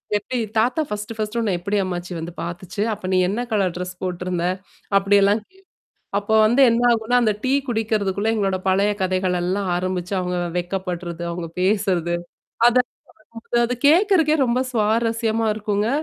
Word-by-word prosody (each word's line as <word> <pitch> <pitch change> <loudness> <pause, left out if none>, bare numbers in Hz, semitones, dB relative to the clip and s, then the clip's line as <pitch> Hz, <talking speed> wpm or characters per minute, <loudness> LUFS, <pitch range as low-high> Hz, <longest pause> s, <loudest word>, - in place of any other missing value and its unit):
எப்படி 210 +5 -2 0.2
தாத்தா 245 +8 +2
1 210 +2 -4
1டு 215 +1 -2
உன்னை 210 -4 0
எப்படி 200 +4 -1
அம்மாச்சி 180 -1 -4
வந்து 165 +1 -6
பார்த்துச்சு? 175 +3 -5
அப்ப 200 - -8
நீ - - +4
என்ன 215 +5 -1
கலர் 195 -5 +1
டிரெஸ் 180 0 -6
போட்டிருந்த? 180 -1 -2 0.5
அப்படி 195 +1 +3
எல்லாம் 200 +2 +3
கே 380 - -25 0.6
அப்போ 205 +2 -1
வந்து 240 +5 +3
என்ன 230 +1 +1
ஆகும்னா, 230 +1 +1
அந்த 220 -2 +3
டீ 260 - +1 0.2
குடிக்குறதுக்குள்ள 215 -3 0
எங்களோடு 195 -4 0
பழைய 195 +2 +3
கதைகள் 185 -1 0
எல்லாம் 190 +2 -1
ஆரம்பிச்சு 180 0 -3
அவங்க 180 0 -2 0.2
வெட்கப்படுறது, 175 -1 -4
அவங்க 170 0 -4
பேசுவது. 185 -3 +1 0.5
அதை. 245 +1 +4 0.8
அது 240 +1 0
கேக்குறகே 330 -2 +4
ரொம்ப 240 +1 +1
சுவாரசியமா 225 0 +1
இருக்குங்க. 210 0 -1
200 Hz, 150 wpm, -22 LUFS, 185-225 Hz, 0.8 s, நீ